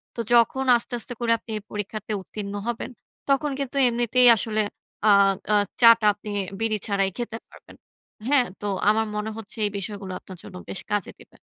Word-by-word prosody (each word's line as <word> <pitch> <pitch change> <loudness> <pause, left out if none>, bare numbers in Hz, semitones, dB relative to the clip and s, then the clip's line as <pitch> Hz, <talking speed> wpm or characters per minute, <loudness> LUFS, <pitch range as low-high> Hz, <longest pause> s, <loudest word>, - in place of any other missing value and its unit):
তো - - -9
যখন 240 +3 +4
আস্তে, 235 - -8
আস্তে 245 - -6
করে 235 -1 0
আপনি 225 - -23
এই - - -7
পরীক্ষাতে 210 +1 -5
উত্তীর্ণ 200 +1 -7
হবেন, 240 +1 -3 0.4
তখন 280 +2 +2
কিন্তু 275 0 -3
এমনিতেই 240 +1 +3
আসলে 215 0 0 0.5
আ - - +8 0.4
আ - - +5 0.3
চা 230 - +10
টা 215 - -2
আপনি 210 +1 -9 0.3
বিড়ি 225 -1 0
ছাড়াই 195 -1 +1
খেতে 235 -2 -4
পারবেন, - - -16 0.5
হ্যাঁ? 270 -3 +4 0.2
তো 205 - -3 0.2
আমার 220 +1 +2
মনে 210 +1 -2
হচ্ছে 225 +1 -6
এই 205 - -1
বিষয়গুলো 200 -1 -6
আপনার 185 -2 -12
জন্য 205 -3 -11
বেশ 190 - -4
কাজে 205 -3 -1
দিবে। - - -18
220 Hz, 185 wpm, -24 LUFS, 205-240 Hz, 0.5 s, চা